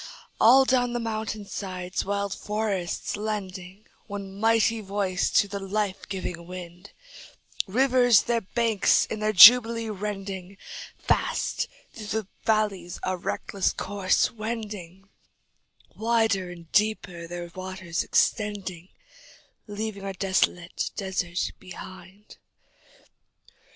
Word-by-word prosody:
All 260 +4 +7
down 245 -2 +2
the 240 - -1
mountain 220 -2 -4
sides 185 -2 -4
wild 200 0 -2
forests 210 -4 -2
lending 200 -2 -5 0.2
One 200 -2 -6
mighty 225 0 +3
voice 195 -2 -1
to 205 - +4
the 200 0 -5
life 195 0 -2
giving 180 -3 -5
wind, 180 +1 -9 0.8
Rivers 245 +1 +4
their 235 -1 0
banks 225 0 +2
in 220 - -5
their 215 0 +1
jubilee 230 +2 +8
rending, 195 -2 -5 0.4
Fast - - 0 0.3
through 215 -2 -8 0.2
the - - -27 0.2
valleys 200 -5 0
a 185 - 0
reckless 185 +2 -2
course 200 -2 +1
wending, 210 -5 -6 0.9
Wider 220 -4 +1
and 170 -2 -12
deeper 195 -5 0
their 175 0 -7
waters 185 -3 -4
extending, 195 -5 0 0.8
Leaving 205 -1 -5
a 195 0 -4
desolate 185 -2 0
desert 190 -3 -2
behind. 190 +2 -12
200 Hz, 105 wpm, -26 LUFS, 185-220 Hz, 0.9 s, jubilee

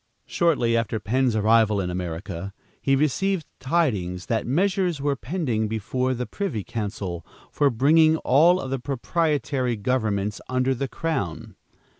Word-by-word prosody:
Shortly 145 -9 +1
after 115 -1 0
Penn's 125 +3 +1
arrival 110 -1 +3
in 90 -2 -2
America, 90 +2 -5 0.3
he 135 - +3
received 160 +5 0
tidings 105 - 0
that 115 -1 -1
measures 180 - +1
were 140 0 0
pending 125 -7 -2
before 125 +4 -1
the 125 +1 -3
privy 130 - -3
council, 100 -6 -4 0.3
for 145 -1 +3
bringing 155 +6 +4
all 165 +7 +4
of 130 - -5
the 135 - -1
proprietary 140 -1 -1
governments 105 -3 -1
under 130 +1 +1
the 135 +2 -3
crown. 100 - -3
125 Hz, 135 wpm, -24 LUFS, 105-150 Hz, 0.3 s, bringing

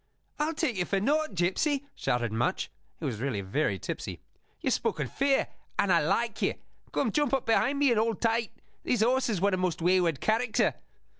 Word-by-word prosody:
"I'll 310 +2 0
take 305 - 0
you 180 - +1
for 195 - 0
nought, 295 +2 +1
gipsy," 265 - +1
shouted 120 -2 -1
Much, 115 +2 -1 0.3
who - - -3
really 110 -2 -2
was 95 - -13
very 120 -8 +1
tipsy. - - -5 0.4
"You've - - +1
spoken - - -1
fair; 275 0 +1 0.3
and - - +3
I - - +5
like - - 0
you! - - +1 0.4
Come, - - 0
jump 290 -3 +2
up 265 - -2
behind 260 +5 +2
me, 280 -2 +4
and 230 - +3
hold 225 -2 0
tight. 230 -1 +1 0.3
This 235 -4 +1
horse 255 +2 +2
is 210 -5 0
one 200 +2 +2
of 185 - +1
most 180 -3 0
wayward 175 -3 +2
character." 220 0 +2
220 Hz, 195 wpm, -29 LUFS, 175-270 Hz, 0.4 s, I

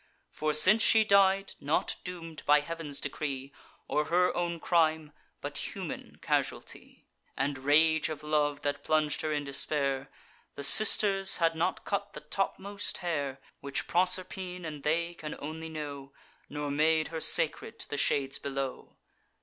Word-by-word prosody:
For 155 0 -1
since 185 +9 +5
she 220 -1 +5
died, 195 -1 +3
not 145 +3 0
doom'd 165 -3 -7
by 150 0 +6
Heav'n's 150 -2 -5
decree, 140 -2 -4 0.3
Or 150 - 0
her 180 +2 +2
own 170 -1 -2
crime, 160 -3 +1 0.3
but - - -4
human - - -7
casualty, - - -3 0.3
And 135 0 -1
rage 155 +2 +3
of 155 -1 -6
love, 150 -1 0
that 145 0 -2
plung'd 155 -1 +1
her 155 - -2
in 145 -1 -1
despair, 140 -1 -1 0.5
The 140 - -6
Sisters 195 +4 +5
had 165 -1 +2
not 165 +3 -2
cut 200 0 -3
the - - -9
topmost 200 +1 -3
hair, 140 -5 -2 0.2
Which 140 -1 -4
Proserpine 180 0 +1
and 150 -3 -6
they 170 +4 -1
can 155 -3 -7
only 160 +2 -7
know; 145 -3 -7 0.4
Nor 145 0 -4
made 155 +2 +2
her 165 - -5
sacred - - +3
to - - -6
the - - -4
shades 135 -1 0
below. 135 -1 -5
155 Hz, 150 wpm, -29 LUFS, 145-175 Hz, 0.5 s, by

